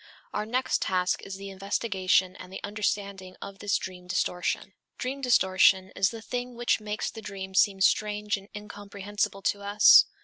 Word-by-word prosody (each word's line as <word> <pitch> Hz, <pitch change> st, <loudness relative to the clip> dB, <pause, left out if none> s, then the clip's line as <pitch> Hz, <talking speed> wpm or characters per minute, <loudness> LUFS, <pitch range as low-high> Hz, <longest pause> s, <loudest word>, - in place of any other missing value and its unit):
Our 210 Hz, +1 st, -2 dB
next 255 Hz, +3 st, 0 dB
task 180 Hz, -1 st, 0 dB
is 195 Hz, -, -7 dB
the 195 Hz, 0 st, -8 dB
investigation 190 Hz, -2 st, 0 dB
and 185 Hz, -, -11 dB
the 190 Hz, -, -6 dB
understanding 200 Hz, -2 st, -3 dB
of 195 Hz, 0 st, -9 dB
this 205 Hz, -1 st, +1 dB
dream 180 Hz, -1 st, -8 dB
distortion. 180 Hz, 0 st, -1 dB, 0.2 s
Dream 270 Hz, +2 st, -4 dB
distortion 190 Hz, -5 st, +4 dB
is 195 Hz, 0 st, +3 dB
the 225 Hz, -2 st, -9 dB
thing 245 Hz, 0 st, -4 dB
which 240 Hz, -1 st, +1 dB
makes 210 Hz, 0 st, -3 dB
the 225 Hz, -, -9 dB
dream 195 Hz, -2 st, -7 dB
seem 195 Hz, 0 st, +3 dB
strange 210 Hz, +1 st, +2 dB
and 200 Hz, +1 st, -11 dB
incomprehensible 205 Hz, -1 st, -4 dB
to 200 Hz, -, 0 dB
us. 205 Hz, +1 st, +7 dB
200 Hz, 165 wpm, -27 LUFS, 190-210 Hz, 0.2 s, us